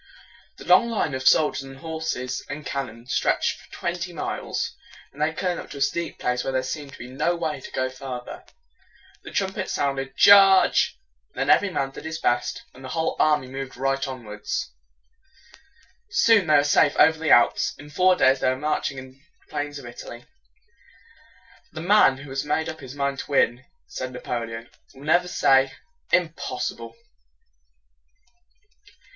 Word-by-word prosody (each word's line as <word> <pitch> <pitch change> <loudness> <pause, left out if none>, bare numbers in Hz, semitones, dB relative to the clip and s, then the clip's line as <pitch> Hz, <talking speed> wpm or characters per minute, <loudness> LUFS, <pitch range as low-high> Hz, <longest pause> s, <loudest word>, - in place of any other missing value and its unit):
The - - -11
long 235 - +5
line 210 -10 -1
of 130 - -3
soldiers 150 -2 +4
and 135 0 -11
horses 160 -5 -4
and 145 0 -6
cannon 120 -4 -5
stretched 130 - 0
for - - -21
twenty 175 +1 -4
miles. 160 - -4 0.4
When 140 - -17
they 155 +1 +1
came 175 +2 -2
to 145 - -9
a - - -7
steep 170 +4 -1
place 125 0 -1
where - - -2
there 130 0 0
seemed 140 +1 -6
to - - -11
be 120 - -9
no 140 +7 -1
way 160 -5 -3
to - - -9
go 130 - -1
farther, 130 -1 -8 0.8
the - - -10
trum 190 -1 -1
pets 190 -2 -4
sounded 135 -1 -2
"Charge!" 195 -1 +6 0.4
Then - - +1
every 205 - +4
man 135 -6 -2
did 135 - -10
his 160 0 -4
best, 120 -5 -1
and 130 - -14
the 130 - -7
whole 160 - 0
army 150 -3 +3
moved 135 -1 -7
right 135 +1 0
onward. 115 -6 -9 1.6
Soon 225 - +4
they 155 - +5
were 145 - +5
safe 145 0 +3
over 160 0 +5
the 160 -1 -1
Alps. 120 - +4
In 150 +1 -12
four 185 +3 +4
days 130 -5 +4
they 130 - +2
were 130 - +1
marching 145 -1 -2
on 130 0 -9
the 135 +1 -26 0.3
plains 145 -1 -3
of 140 - -10
Italy. 120 0 -10 1.5
"The 155 - -6
man 175 -7 +5
who 135 0 -11
has 135 0 -2
made 160 +2 -1
up 160 0 -7
his 135 -1 -10
mind 140 -1 -2
to - - -7
win," 135 -2 +2 0.2
said 130 0 -6
Napoleon, 115 -1 -5 0.2
"will 135 - -13
never 175 +4 +3
say 135 -5 +3 0.4
'Im 170 -2 +2
pos 145 - -3
si - - -8
ble.'" 115 0 -11
140 Hz, 175 wpm, -24 LUFS, 130-160 Hz, 1.6 s, Charge